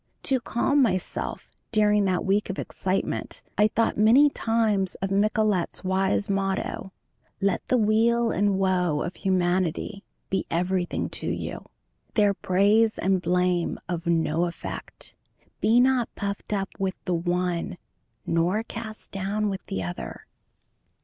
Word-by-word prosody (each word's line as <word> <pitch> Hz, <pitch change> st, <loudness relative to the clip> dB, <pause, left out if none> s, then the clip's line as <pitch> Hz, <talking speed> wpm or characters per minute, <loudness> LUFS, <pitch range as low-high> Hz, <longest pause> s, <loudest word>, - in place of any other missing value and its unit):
To 265 Hz, -1 st, +2 dB
calm 260 Hz, +4 st, +1 dB
myself 185 Hz, -8 st, -1 dB, 0.2 s
during 210 Hz, -2 st, +3 dB
that 185 Hz, -2 st, 0 dB
week 200 Hz, +2 st, +1 dB
of 190 Hz, -, -3 dB
excitement, 190 Hz, +1 st, -3 dB
I 210 Hz, -, +5 dB
thought 225 Hz, 0 st, 0 dB
many 255 Hz, +7 st, +6 dB
times 220 Hz, -6 st, +1 dB
of 195 Hz, +1 st, -4 dB
Michelet's 205 Hz, -2 st, +1 dB
wise 190 Hz, +2 st, +1 dB
motto, 195 Hz, -1 st, -2 dB, 0.5 s
"Let 195 Hz, -1 st, 0 dB
the 255 Hz, -, +3 dB
weal 230 Hz, +1 st, +3 dB
and 200 Hz, 0 st, +1 dB
woe 180 Hz, -5 st, +1 dB
of 175 Hz, -, -5 dB
humanity 185 Hz, +1 st, 0 dB, 0.3 s
be 190 Hz, -1 st, 0 dB
everything 180 Hz, +1 st, -1 dB
to -, -, -4 dB
you, -, -, -4 dB, 0.5 s
their 205 Hz, -2 st, +4 dB
praise 205 Hz, +4 st, +3 dB
and 190 Hz, -1 st, +1 dB
blame 180 Hz, 0 st, +1 dB
of 170 Hz, 0 st, -4 dB
no 165 Hz, 0 st, +2 dB
effect; 170 Hz, -, -7 dB, 0.5 s
be 230 Hz, +2 st, +4 dB
not 255 Hz, -1 st, +3 dB
puffed 200 Hz, 0 st, -4 dB
up 195 Hz, -2 st, -1 dB
with 190 Hz, -1 st, -1 dB
the 180 Hz, -, 0 dB
one 175 Hz, 0 st, -1 dB, 0.5 s
nor 175 Hz, +6 st, +1 dB
cast 225 Hz, -1 st, -7 dB
down 200 Hz, +2 st, -1 dB
with 190 Hz, -, -5 dB
the 95 Hz, -, -3 dB
other." 90 Hz, 0 st, -6 dB
195 Hz, 135 wpm, -26 LUFS, 180-215 Hz, 0.5 s, many